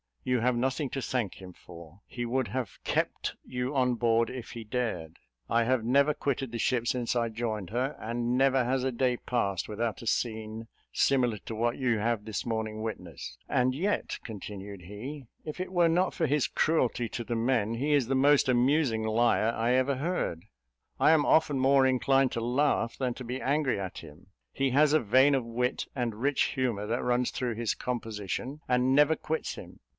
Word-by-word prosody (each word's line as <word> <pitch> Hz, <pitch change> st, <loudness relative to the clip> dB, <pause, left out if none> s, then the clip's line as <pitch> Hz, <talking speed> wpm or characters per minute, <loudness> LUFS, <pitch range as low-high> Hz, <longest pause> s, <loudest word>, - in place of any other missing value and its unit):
You 125 Hz, -1 st, +1 dB
have 125 Hz, +2 st, +2 dB
nothing 130 Hz, +3 st, -1 dB
to 135 Hz, -, -3 dB
thank 120 Hz, -5 st, -2 dB
him 90 Hz, -1 st, -10 dB
for: 85 Hz, +2 st, -14 dB
he 120 Hz, -1 st, -4 dB
would 130 Hz, +1 st, 0 dB
have 125 Hz, -7 st, -4 dB
kept -, -, -1 dB
you 125 Hz, +2 st, -3 dB
on 125 Hz, -2 st, +2 dB
board 115 Hz, -1 st, +2 dB
if 125 Hz, -2 st, -7 dB
he 115 Hz, -, -7 dB
dared. 105 Hz, -9 st, -3 dB, 0.3 s
I 115 Hz, 0 st, +3 dB
have 125 Hz, 0 st, +1 dB
never 140 Hz, +5 st, +3 dB
quitted 135 Hz, -4 st, -2 dB
the 115 Hz, -, -4 dB
ship 120 Hz, 0 st, +1 dB
since 125 Hz, -1 st, 0 dB
I 115 Hz, -1 st, +1 dB
joined 110 Hz, -4 st, -4 dB
her; 130 Hz, +5 st, -1 dB
and 120 Hz, +2 st, -1 dB
never 135 Hz, -1 st, +4 dB
has 130 Hz, +1 st, 0 dB
a 130 Hz, -, 0 dB
day 125 Hz, 0 st, +1 dB
passed 100 Hz, -8 st, -1 dB
without 110 Hz, +1 st, -3 dB
a -, -, -7 dB
scene 110 Hz, 0 st, -2 dB, 0.2 s
similar 125 Hz, -5 st, +2 dB
to 110 Hz, -, -5 dB
what 120 Hz, +2 st, 0 dB
you 120 Hz, -4 st, +1 dB
have 110 Hz, 0 st, -1 dB
this 110 Hz, -3 st, -4 dB
morning 110 Hz, -2 st, -3 dB
witnessed. 110 Hz, -1 st, -7 dB
And 130 Hz, 0 st, +2 dB
yet," 195 Hz, +8 st, -1 dB
continued 100 Hz, -3 st, -8 dB
he, 125 Hz, -, -8 dB, 0.2 s
"if 155 Hz, +3 st, -7 dB
it 185 Hz, 0 st, -4 dB
were 175 Hz, -2 st, +4 dB
not 180 Hz, +3 st, +2 dB
for 160 Hz, -, +1 dB
his 145 Hz, 0 st, +2 dB
cruelty 125 Hz, -7 st, +1 dB
to 120 Hz, -, -4 dB
the 120 Hz, +1 st, -3 dB
men, 115 Hz, -2 st, +1 dB
he 145 Hz, +5 st, 0 dB
is 140 Hz, -4 st, +3 dB
the 135 Hz, -, +1 dB
most 140 Hz, +1 st, +4 dB
amusing 125 Hz, -1 st, +2 dB
liar 110 Hz, 0 st, +2 dB
I 115 Hz, +2 st, +1 dB
ever 130 Hz, +2 st, +2 dB
heard. 130 Hz, -, -2 dB, 0.5 s
I -, -, +5 dB
am 155 Hz, -2 st, +4 dB
often 150 Hz, -4 st, +3 dB
more 135 Hz, 0 st, +5 dB
inclined 135 Hz, 0 st, +3 dB
to 115 Hz, -, -2 dB
laugh 125 Hz, 0 st, +1 dB
than 125 Hz, -3 st, -2 dB
to 130 Hz, -, -7 dB
be 125 Hz, +2 st, -4 dB
angry 140 Hz, -4 st, +1 dB
at 95 Hz, -2 st, -5 dB
him; 80 Hz, +3 st, -14 dB, 0.2 s
he 135 Hz, -1 st, 0 dB
has 145 Hz, +3 st, +4 dB
a 155 Hz, -, +5 dB
vein 130 Hz, +5 st, +4 dB
of 130 Hz, -3 st, +1 dB
wit 125 Hz, +2 st, -2 dB
and 120 Hz, -4 st, -2 dB
rich 140 Hz, +1 st, +2 dB
humour 120 Hz, -6 st, -1 dB
that 115 Hz, +2 st, -1 dB
runs 125 Hz, 0 st, +1 dB
through 125 Hz, -3 st, -2 dB
his 115 Hz, -1 st, -1 dB
composition, 120 Hz, +3 st, -4 dB
and 125 Hz, +1 st, +2 dB
never 150 Hz, +2 st, +5 dB
quits 160 Hz, +1 st, -3 dB
him. -, -, -11 dB
125 Hz, 195 wpm, -29 LUFS, 115-135 Hz, 0.5 s, I